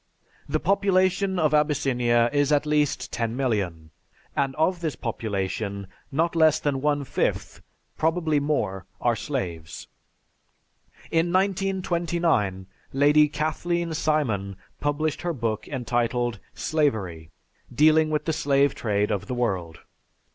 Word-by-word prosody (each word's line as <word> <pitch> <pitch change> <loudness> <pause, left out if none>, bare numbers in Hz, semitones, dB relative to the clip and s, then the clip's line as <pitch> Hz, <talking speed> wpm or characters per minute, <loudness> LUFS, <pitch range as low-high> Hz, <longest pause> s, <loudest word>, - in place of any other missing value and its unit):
The 155 +2 +1
population 190 0 +2
of 155 -3 +2
Abyssinia 125 -6 +2
is 145 0 +2
at 145 0 +3
least 150 -1 0
ten 115 0 -2
million, 95 - -2 0.4
and 135 -1 0
of 170 +3 +1
this 160 -4 -2
population 100 -3 -3 0.3
not 165 +4 0
less 160 -2 +4
than 140 -2 -1
one 145 0 +1
fifth, - - -2 0.4
probably 160 -2 +1
more, 105 -11 -1
are 120 -1 +2
slaves. 90 - -5 1.2
In 165 +1 +2
1929, 175 - 0 0.3
Lady 145 +2 +5
Kathleen 165 +3 -1
Simon 125 -12 0 0.2
published 145 +1 -1
her 175 0 -1
book 115 -6 -3
entitled, 120 -3 -1 0.2
"Slavery," 100 - -1 0.4
dealing 155 +4 +4
with 150 -1 -1
the 160 - 0
slave 140 -2 +2
trade 105 -1 0
of 100 -1 -2
the 125 - -3
world. 95 -9 -2
145 Hz, 120 wpm, -25 LUFS, 115-160 Hz, 1.2 s, Lady